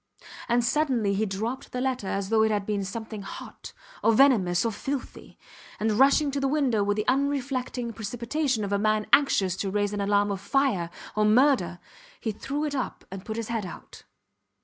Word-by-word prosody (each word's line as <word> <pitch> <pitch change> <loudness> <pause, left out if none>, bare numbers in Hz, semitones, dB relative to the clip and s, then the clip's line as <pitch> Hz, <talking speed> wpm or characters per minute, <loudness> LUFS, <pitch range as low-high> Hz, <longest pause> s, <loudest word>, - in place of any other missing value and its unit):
And 240 0 +3
suddenly 245 -7 +1
he 215 +2 0
dropped 220 +7 -4
the 250 - -2
letter 255 -5 -1
as 195 0 -2
though 220 -1 +3
it 220 - +4
had 205 -2 -1
been 205 -1 -1
something 220 +2 -6
hot, 195 - -9 0.3
or 225 - +5
venomous, 215 -8 +4
or 230 - +1
filthy; 270 +5 -6 0.4
and 220 +1 +1
rushing 275 +6 +4
to 280 - -2
the 275 - +1
window 265 -7 +1
with 205 +1 0
the 215 - -2
unreflecting 260 -3 -1
precipitation 235 +3 -2
of 200 0 -2
a 200 - +2
man 215 0 +1
anxious 195 -10 +4
to 195 - -2
raise 205 +1 0
an 205 - -2
alarm 205 0 +2
of 195 -1 -4
fire 210 -7 +1 0.3
or 215 - +2
murder, 230 -5 +3 0.4
he 220 - -2
threw 285 +8 -3
it 295 - -3
up 260 -3 -4
and 195 0 -8
put 220 0 -4
his 230 -1 -4
head 230 -2 -1
out. 180 - -10
220 Hz, 195 wpm, -26 LUFS, 205-265 Hz, 0.4 s, or